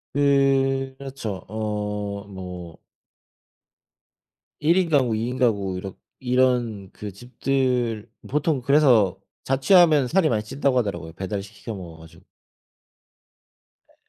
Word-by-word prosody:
예. 135 -1 +2
그렇죠. 130 -8 -6
어 105 -1 -3
뭐 90 -4 -8 1.8
1 165 +4 +3
인 185 -3 +2
가구 130 -7 +2
2 110 +2 -2
인 125 +1 -4
가구 100 -7 +1
이렇 95 0 -7 0.2
이런 125 -6 +1
그 105 -1 -7
집들 120 0 -1 0.2
보통 150 -1 0
그래서 120 - +4 0.2
자취하면 150 +1 +4
살이 170 +4 +3
많이 110 -3 0
찐다고 135 +4 0
하더라고요 90 -8 -2
배달 95 +3 -4
시 100 +2 -14
시켜 105 +2 -7
먹어 85 -4 -9
가지고. 80 +3 -16 1.6
예. - - -28
115 Hz, 215 characters per minute, -24 LUFS, 100-135 Hz, 1.8 s, 그래서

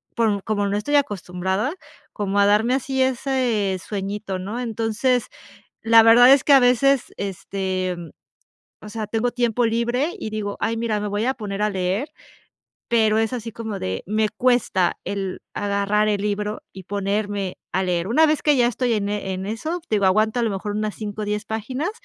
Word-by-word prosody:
porn 220 -4 +1
como 205 0 -1
no 200 - -1
estoy 290 +8 -1
acostumbrada, 195 - -1 0.4
como 205 -1 -1
a 200 - +5
darme 215 +4 +3
así 265 0 -1
ese 250 -6 0
sueñito, 200 -1 -4
¿no? 205 +6 -5
Entonces, 230 +1 0 0.6
la 225 0 +7
verdad 235 +3 +8
es 275 -1 +4
que 290 - +4
a 270 - +8
veces, 250 +2 +3
este, 190 -1 -3
mm, 170 -2 -9 0.7
o - - -8
sea, 220 -1 -4
tengo 225 +3 0
tiempo 240 -1 +1
libre 240 +6 0
y 270 - -4
digo: 210 -2 -4
"Ay, 230 - 0
mira, 225 -2 -1
me 210 - -3
voy 205 +2 -1
a 260 - +2
poner 205 -3 -4
a 210 - +2
leer", 190 +9 -2 0.8
pero 220 -2 +3
es 225 +1 0
así 230 -2 -5
como 220 -2 -5
de 95 0 -3
me 215 +1 +1
cuesta 215 -6 +1
el 195 -2 -4
agarrar 205 +1 0
el 205 -1 0
libro 210 +1 -2
y 190 - -10
ponerme 200 -1 -2 0.2
a 190 - +1
leer. 175 -1 -1
Una 310 +9 +4
vez 310 -1 +1
que 295 -1 +4
ya 245 - +4
estoy 245 0 0
en 205 -2 -1
en 190 -2 -3
eso, 310 - -3
te - - +2
digo, 200 - +1
aguanto 215 +5 +2
a - - +1
lo 230 - +1
mejor 200 +1 -4
unas 215 0 -2
5, 210 0 -5
10 210 0 -2
páginas 255 - -3
215 Hz, 190 wpm, -22 LUFS, 200-240 Hz, 0.8 s, verdad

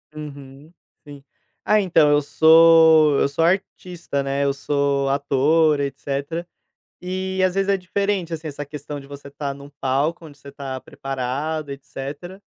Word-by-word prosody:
Uhum, 145 0 -10 0.4
sim. 140 -1 -12 0.4
Ah, 215 0 +4
então, 155 -5 +3
eu 145 0 +4
sou 160 -1 +6
eu - - +3
sou 155 +3 -1
artista, 175 -4 -2
né, 140 +1 -1
eu 140 - +1
sou 140 0 0
ator, 145 +2 +2
etcétera. 140 +4 -4 0.6
E, 185 +1 -3
às 180 - -3
vezes, 195 0 0
é 200 - +3
diferente, 190 -2 -2
assim, 160 0 -6
essa 145 0 -6
questão 145 0 -7
de 135 - -14
você 140 0 -11
estar 140 0 -5
num 140 +1 -13
palco, 145 +6 -1
onde 145 -2 -14
você 140 0 -13
tá 135 -1 -6
preparado, 135 +3 -4
etcétera. 145 +7 -8
145 Hz, 155 wpm, -21 LUFS, 140-165 Hz, 0.6 s, sou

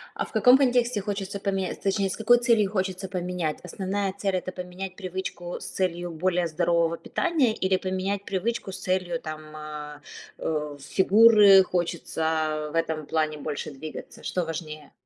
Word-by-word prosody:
А, - - -2
в - - -15
каком 250 +1 +6
контексте 245 -5 +2
хочется 200 0 -4
поменять, 195 -2 -2
точнее, 195 0 +1
с - - -4
какой 240 +2 +5
целью 230 -5 +3
хочется 190 -1 -2
поменять? 180 -4 -3
Основная 190 +2 -2
цель- 195 -2 0
это 185 0 -3
поменять 180 +1 -7
привычку 185 -2 -5
с - - -8
целью 175 -2 -2
более 175 +1 0
здорового 170 0 +1
питания, 310 -11 +1
или 190 -2 +1
поменять 190 +2 -2
привычку 200 +1 -2
с - - -6
целью, 185 -2 -1
там, 155 0 -8
а, 150 -1 -8 0.4
э, 150 -2 -3
фигуры, 200 +1 +7
хочется, 175 -2 -2
а, 155 -1 -1
в - - -8
этом 160 -2 -1
плане, 155 -1 0
больше 150 0 -4
двигаться? 155 +3 -9
Что 180 - -1
важнее? 155 -2 -6
185 Hz, 160 wpm, -26 LUFS, 160-195 Hz, 0.4 s, фигуры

